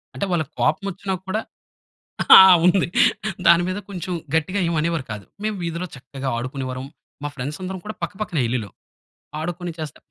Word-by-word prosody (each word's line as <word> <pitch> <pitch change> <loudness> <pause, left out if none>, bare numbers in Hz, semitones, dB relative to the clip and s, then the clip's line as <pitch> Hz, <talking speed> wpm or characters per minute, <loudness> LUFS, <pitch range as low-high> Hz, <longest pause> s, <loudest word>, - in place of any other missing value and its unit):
అంటే 200 - -1
వాళ్ళకి 155 -4 -1
కోపం 200 - +1
వచ్చినా 190 +2 -4
కూడా, 215 +4 -1 1.3
ఉంది. 180 0 +4 0.6
దాని 170 +1 +7
మీద 185 - -2
కొంచెం, 180 -1 -5 0.2
గట్టిగా 185 +5 +1
ఏమి 170 - -1
అనేవారు 165 -4 -1
కాదు. 105 -2 -7 0.2
మేము 215 -1 -1
వీధిలో 170 +2 -3
చక్కగా 135 +1 -6
ఆడుకునేవారము. 130 +1 -4 0.3
మా 145 - -2
ఫ్రెండ్స్ 140 +3 -5
అందరం 185 +1 -4
కూడా 215 - -5
పక్కపక్కనే 200 -8 -2
ఇల్లులు. 115 -6 -2 0.7
ఆడుకొని 175 +1 -4
చేస్తే 155 -2 -6
170 Hz, 150 wpm, -22 LUFS, 135-185 Hz, 1.3 s, దాని